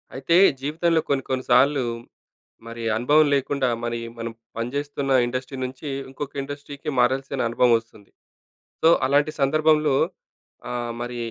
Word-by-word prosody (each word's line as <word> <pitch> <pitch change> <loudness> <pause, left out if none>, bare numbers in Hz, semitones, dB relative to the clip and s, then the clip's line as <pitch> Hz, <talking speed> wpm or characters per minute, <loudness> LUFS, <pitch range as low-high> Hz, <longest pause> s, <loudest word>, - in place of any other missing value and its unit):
అయితే 165 +5 +1 0.3
జీవితంలో 160 +3 +1
కొన్ని 140 -2 +1
కొన్ని 130 -1 -1
సార్లు, 135 +2 +4 0.8
మరి 115 0 -7
అనుభవం 150 +7 +4
లేకుండా, 140 -1 0 0.2
మరి 120 0 -2 0.2
మనం 115 0 -4 0.2
పనిచేస్తున్న 140 +4 -3 0.2
ఇండస్ట్రీ 130 +2 -5
నుంచి, 130 +4 -6 0.2
ఇంకొక 140 +1 -7
ఇండస్ట్రీకి 145 +1 -7
మారాల్సిన 135 +2 0
అనుభవం 120 +1 +3
వస్తుంది. 110 -3 -18 0.7
సో, 160 - +7 0.2
అలాంటి 145 +3 +2
సందర్భంలో 155 0 +3 0.7
ఆహ్, 120 -1 -3
మరి 120 0 -5
135 Hz, 120 wpm, -23 LUFS, 120-145 Hz, 0.8 s, సో